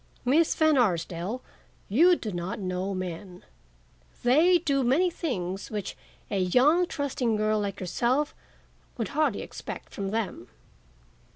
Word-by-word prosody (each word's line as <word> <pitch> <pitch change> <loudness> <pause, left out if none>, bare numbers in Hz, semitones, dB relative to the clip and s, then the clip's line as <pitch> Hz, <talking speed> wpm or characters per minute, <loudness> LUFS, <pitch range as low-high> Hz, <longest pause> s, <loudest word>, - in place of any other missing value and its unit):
Miss 305 +6 +3
Van 315 -3 +4
Arsdale, 180 +2 -1 0.4
you 335 - +5
do 220 -9 -5
not 175 +1 -4
know 185 0 -2
men. 180 0 -6 0.8
They 315 +9 +5
do 280 -5 0
many 315 +9 +3
things 195 - -3
which 210 -3 -4 0.4
a 200 - 0
young, 275 - +4
trusting 265 -7 -1
girl 215 0 +1
like 200 -1 -3
yourself 245 - 0 0.6
would 225 -5 -2
hardly 290 -7 0
expect - - -8
from 195 -1 -3
them." 220 0 -3
225 Hz, 125 wpm, -27 LUFS, 190-290 Hz, 0.8 s, you